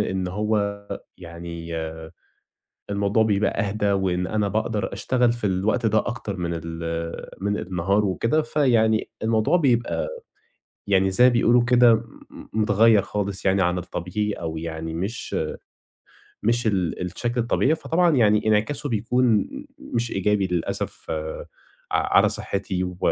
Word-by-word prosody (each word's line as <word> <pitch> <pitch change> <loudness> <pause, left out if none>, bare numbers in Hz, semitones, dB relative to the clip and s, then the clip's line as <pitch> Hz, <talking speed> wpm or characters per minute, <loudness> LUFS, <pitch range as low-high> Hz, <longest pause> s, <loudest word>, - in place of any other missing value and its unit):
إن 95 -1 -1
هو 105 +1 -1 0.4
يعني 85 -1 -7 1.2
الموضوع 100 +2 +2
بيبقى 105 0 +1
أهدى، 100 0 0
وإن 90 -2 0
أنا 105 0 0
باقدر 105 0 -1
أشتغل 125 -2 +1
في 120 -3 -3
الوقت 95 +4 0
ده 110 0 +3
أكتر 110 -3 -3
من 85 -2 -3
ال 85 0 -5
من 100 +1 0
النهار 95 +3 0
وكده، 115 +10 +1
فيعني 120 -8 +2
الموضوع 110 +8 +2
بيبقى 125 - +1 0.8
يعني 95 -1 +3
زي 120 +7 +4
ما 125 - +7
بيقولوا 120 0 +4
كده 120 -1 +6
م 115 +1 -2 0.5
متغيّر 110 0 +4
خالص 100 -1 -3
يعني 95 0 +3
عن 90 +1 +1
الطبيعي 90 +4 -3
أو 80 -4 -5
يعني 80 0 -5
مش 95 +8 -4 1.1
مش 120 +1 +1
ال 95 -6 0
الشكل 120 +7 -2
الطبيعي. 130 +6 +2
فطبعًا 170 0 +2
يعني 105 -3 +3
انعكاسه 110 +7 +1
بيكون 120 +3 +1
م 280 +1 -6
مش 120 -1 -3
إيجابي 100 0 +1
للأسف 90 -2 -3 0.8
ع - - +2
على - - +6
صحتي 95 -2 -2
و 90 -1 -5
105 Hz, 135 wpm, -24 LUFS, 95-115 Hz, 1.2 s, ما